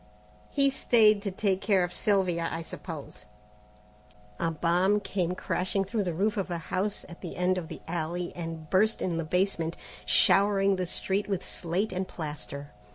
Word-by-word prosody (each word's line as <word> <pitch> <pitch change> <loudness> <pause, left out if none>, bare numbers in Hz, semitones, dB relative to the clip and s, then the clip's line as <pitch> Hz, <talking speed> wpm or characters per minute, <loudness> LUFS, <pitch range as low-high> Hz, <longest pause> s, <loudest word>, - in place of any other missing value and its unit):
"He 275 -1 +3
stayed 215 -5 +4
to 200 - -2
take 195 0 0
care 195 -2 +3
of 175 0 -3
Sylvia, 180 -5 +1
I 165 +1 -3
suppose." 160 - -8 1.1
A 165 - +1
bomb 175 +5 +2
came 185 -3 -2
crashing 185 +2 0
through 205 +1 -1
the 175 - -1
roof 210 +5 +1
of 195 -2 -1
a 175 - -2
house 185 +5 -2
at 170 - -12
the 175 - -6
end 180 +1 +2
of 165 - -7
the 160 - -8
alley 175 +1 -3
and 165 -2 -6
burst 215 +4 +3
in 175 -3 -1
the - - -1
basement, 170 -1 0 0.3
showering 195 -1 +4
the 180 -1 -2
street 195 +3 -1
with 190 -2 -1
slate 185 +5 -2
and 185 0 -2
plaster. 145 -2 -6
185 Hz, 170 wpm, -28 LUFS, 170-200 Hz, 1.1 s, stayed